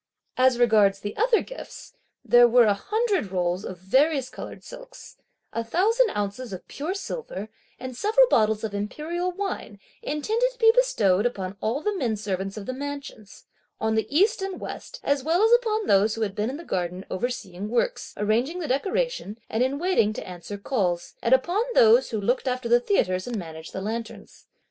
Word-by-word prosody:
As 255 -1 +4
regards 215 -5 +4
the 205 +1 -6
other 460 +1 +3
gifts, - - -10 0.3
there 240 0 +7
were 240 +1 +6
a 210 - +4
hundred 405 - -1
rolls 180 0 -1
of 185 - -6
various 265 - +1
coloured - - -9
silks, - - -12 0.4
a 230 - -1
thousand 430 - +2
ounces 205 +4 -3
of 185 - -8
pure 320 +7 -4
silver, 385 - -6 0.3
and 255 0 -6
several 445 - +4
bottles 220 - +2
of 215 -2 -3
imperial 310 - -3
wine, 385 - -5 0.2
intended 435 +12 0
to - - -25
be 450 -2 +6
bestowed 450 - +3
upon 195 -5 -5
all 240 +7 -1
the 420 +6 -1
men 245 - 0
servants 195 -1 -4
of 205 - -6
the 255 - -3
mansions, 280 -7 -8 0.3
on 220 0 0
the 220 0 0
East 390 +8 +3
and 385 -1 -3
the - - -10
West, - - -8
as 280 -2 +1
well 335 +7 +2
as 450 - +4
upon 445 -3 +3
those 205 - +3
who 225 - -5
had 205 -3 -1
been 210 +3 -1
in 270 - -5
the 335 - -9
garden 180 - -3
overseeing 195 -2 -4
works, 365 - -1
arranging 235 - 0
the 345 -4 -4
decorations, 385 - -1
and 220 - 0
in 260 +2 +1
waiting 315 - +2
to - - -7
answer 180 +3 -7
calls, 190 -6 -1
and 245 +2 +5
upon 345 +10 0
those 475 0 +6
who 220 - -2
looked 245 +6 0
after 255 -1 -1
the 240 +1 +5
theatres 185 - 0
and 240 -2 -3
managed 160 -3 -8
the 190 - -5
lanterns. 225 +2 -6
245 Hz, 190 wpm, -25 LUFS, -, 0.4 s, there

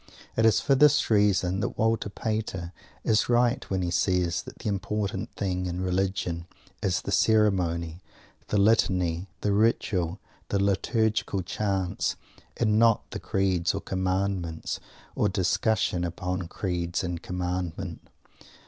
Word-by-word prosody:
It 115 0 +4
is 110 - +4
for 140 - +2
this 145 -2 +4
reason 95 -3 +3
that 100 - -3
Walter 110 -1 +1
Pater 100 -5 -3 0.3
is 110 +1 +2
right 120 +1 +3
when 95 -1 0
he 85 - -1
says 90 -1 +1
that - - -11
the - - -6
important 100 +1 -2
thing 90 -2 -1
in 90 0 -3
Religion 90 -2 -1 0.3
is 95 -1 0
the - - -4
Ceremony, 90 -7 +2 0.5
the 105 - 0
Litany, 95 -4 +2
the 105 - +1
Ritual, 100 -4 +1 0.3
the 100 - +1
Liturgical 100 0 +1
Chants, 95 -1 -1 0.4
and 110 -2 +2
not 115 -2 +3
the - - -4
Creeds 95 -2 0
or - - -1
the - - -15
Commandments, 95 -3 -1 0.3
or 105 - +1
discussion 95 0 +1
upon 90 +1 -3
Creed 85 -1 -3
or 90 -2 -3
Commandment. 90 0 -4
95 Hz, 135 wpm, -27 LUFS, 90-105 Hz, 0.5 s, It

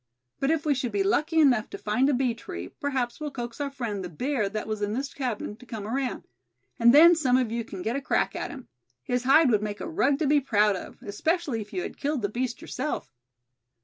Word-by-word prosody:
But 275 - +1
if 320 0 +1
we 300 - +3
should 255 -3 -2
be 395 - +1
lucky 325 -4 +2
enough 255 -8 +4
to - - -6
find 250 +7 +1
a - - +3
bee 250 -2 +1
tree, 90 - -7
perhaps 260 -4 -3
we'll 305 -1 -3
coax 240 -1 -6
our 285 - -1
friend, 230 -8 -4
the 180 - -5
bear 230 - -1
that 215 +1 -4
was 215 -1 -4
in 205 0 -1
this 270 +4 -3
cabin, 240 -6 -3
to 250 - -15
come 220 -3 -6
around; 255 +4 -2 0.6
and 235 0 +7
then 325 +6 +9
some 265 -7 +3
of 250 -4 0
you 235 0 -2
can 190 -4 -8
get 225 +3 -1
a 280 - -2
crack - - 0
at - - -3
him. 260 -3 -9 0.4
His 250 - -1
hide 275 +1 +6
would 210 -2 +3
make 210 -1 -4
a - - -5
rug 290 -5 +2
to 310 - 0
be 290 +1 +4
proud 210 -5 +3
of, 185 - -8
especially 295 - -1
if 210 - -10
you 365 - -2
had - - -7
killed 285 -4 -1
the 205 - +1
beast 240 +2 -3
yourself." 255 - -4
250 Hz, 245 wpm, -27 LUFS, 215-285 Hz, 0.6 s, then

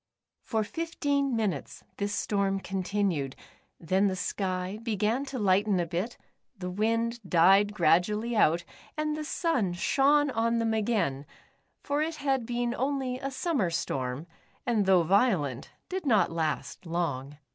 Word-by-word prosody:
For 220 -2 -1
fifteen 285 -2 -1
minutes 200 -10 -2
this 205 0 -2
storm 195 -1 0
continued, 185 -6 -1 0.4
then 190 +4 +2
the 190 - -1
sky 185 0 -2
began 225 +3 0
to 270 -1 -5
lighten 200 -2 +2
a 175 - +1
bit, 180 +8 -3 0.4
the 180 -1 -5
wind 230 +4 0
died 195 +3 +4
gradually 210 +7 +2
out, 170 -4 +3 0.3
and 305 0 0
the 305 - -4
sun 300 - 0
shone 285 +9 +3
on 230 0 +1
them 225 -1 +1
again, 205 - 0 0.6
for 290 0 0
it 320 +1 -1
had 270 -5 -1
been 240 0 -1
only 260 0 -1
a 275 - -3
summer 265 - 0
storm, 135 -4 -2 0.4
and 215 -5 +1
though 185 -3 +5
violent, 170 - +1 0.2
did 370 -4 -4
not 220 -9 +3
last 165 +2 -3
long. 145 -5 -2
210 Hz, 140 wpm, -28 LUFS, 180-250 Hz, 0.6 s, though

